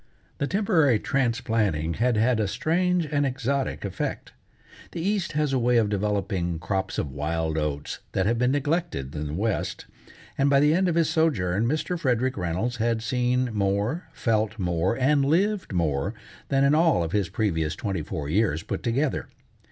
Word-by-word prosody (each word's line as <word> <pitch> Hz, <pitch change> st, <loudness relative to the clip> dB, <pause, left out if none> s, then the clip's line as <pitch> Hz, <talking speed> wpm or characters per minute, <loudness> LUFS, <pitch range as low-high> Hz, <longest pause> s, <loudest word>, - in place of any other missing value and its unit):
The 140 Hz, -, 0 dB
temporary 170 Hz, -, +3 dB
transplanting 115 Hz, -, 0 dB
had 120 Hz, -2 st, +3 dB
had 115 Hz, +1 st, +2 dB
a 105 Hz, -, +1 dB
strange 175 Hz, -, +1 dB
and 145 Hz, -1 st, 0 dB
exotic 135 Hz, -2 st, -1 dB
effect. 95 Hz, -2 st, -4 dB, 0.6 s
The -, -, -4 dB
East 195 Hz, 0 st, -1 dB
has 150 Hz, -2 st, 0 dB
a 130 Hz, -, +2 dB
way 120 Hz, 0 st, +3 dB
of 110 Hz, -3 st, +3 dB
developing 95 Hz, -4 st, -1 dB
crops 95 Hz, +4 st, -2 dB
of 70 Hz, -, -2 dB
wild 80 Hz, +3 st, -2 dB
oats 75 Hz, -2 st, -3 dB
that 95 Hz, -, +1 dB
have 115 Hz, +2 st, +1 dB
been 125 Hz, 0 st, +3 dB
neglected 145 Hz, -, -1 dB
in 75 Hz, 0 st, -3 dB
the 75 Hz, -, -5 dB
West, 105 Hz, +3 st, -2 dB, 0.5 s
and 140 Hz, +1 st, +4 dB
by 140 Hz, -1 st, +5 dB
the 150 Hz, +2 st, +4 dB
end 185 Hz, +2 st, +2 dB
of 170 Hz, -, 0 dB
his 165 Hz, -2 st, +2 dB
sojourn 115 Hz, -, +1 dB
Mr. 155 Hz, +5 st, -1 dB
Frederick 130 Hz, -2 st, +1 dB
Reynolds 95 Hz, +7 st, -2 dB
had 115 Hz, 0 st, 0 dB
seen 125 Hz, 0 st, 0 dB
more, 105 Hz, -, 0 dB
felt 110 Hz, -1 st, 0 dB
more, 90 Hz, +2 st, 0 dB
and 140 Hz, +2 st, +3 dB
lived 185 Hz, +7 st, +1 dB
more 75 Hz, -7 st, 0 dB, 0.3 s
than 135 Hz, 0 st, +3 dB
in 140 Hz, +1 st, +4 dB
all 160 Hz, -, +3 dB
of 80 Hz, -, -4 dB
his 100 Hz, -4 st, 0 dB
previous 80 Hz, -9 st, -1 dB
twenty 95 Hz, -6 st, -3 dB
four 75 Hz, -1 st, -5 dB
years 85 Hz, -2 st, +1 dB
put -, -, -4 dB
together. 130 Hz, +4 st, -1 dB
115 Hz, 175 wpm, -25 LUFS, 95-140 Hz, 0.6 s, by